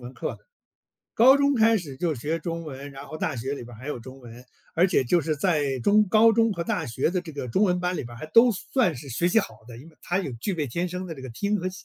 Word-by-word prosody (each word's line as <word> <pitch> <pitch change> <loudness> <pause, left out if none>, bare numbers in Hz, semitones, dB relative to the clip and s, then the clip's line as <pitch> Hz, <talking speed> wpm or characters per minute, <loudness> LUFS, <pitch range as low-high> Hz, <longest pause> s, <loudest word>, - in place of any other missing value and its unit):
文 125 +1 -9
课 - - -3
的。 - - -30 0.7
高 260 +4 +7
中 280 0 +2
开 225 -1 +4
始 150 -9 -6
就 165 +2 -1
学 150 +6 -2
中 165 -1 -5
文， 140 -1 -8
然 135 +1 -10
后 155 - -8
大 155 - -2
学 125 +3 -4
里 140 - -8
边 120 -1 -12
儿 - - -17
还 130 - -10
有 150 - -3
中 130 +3 -11
文， 120 -1 -13 0.3
而 170 +3 +4
且 175 -8 +2
就 170 +8 +3
是 155 0 -2
在 145 -5 0
中 210 - +4
高 220 +3 +6
中 225 0 +3
和 170 -3 -4
大 185 -7 -2
学 130 +5 0
的 180 0 -1
这 170 -3 -10
个 140 -3 -5
中 190 - +2
文 180 -2 +1
班 180 0 -1
里 - - -3
边 120 -1 -10
儿 - - -11
还 - - -7
都 235 +7 +6
算 210 - 0
是 135 +3 -9
学 170 +9 +1
习 200 - +4
好 220 - -3
的， 120 - -10
因 135 +7 -12
为 160 - -21
他 175 - -1
有 170 -9 -3
具 200 - -2
备 155 -4 -2
天 170 +8 -2
生 180 +1 -5
的 165 - -6
这 135 - -11
个 130 - -8
听 200 - -1
和 185 0 -2
写 185 0 -11
165 Hz, 325 characters per minute, -25 LUFS, 135-195 Hz, 0.7 s, 高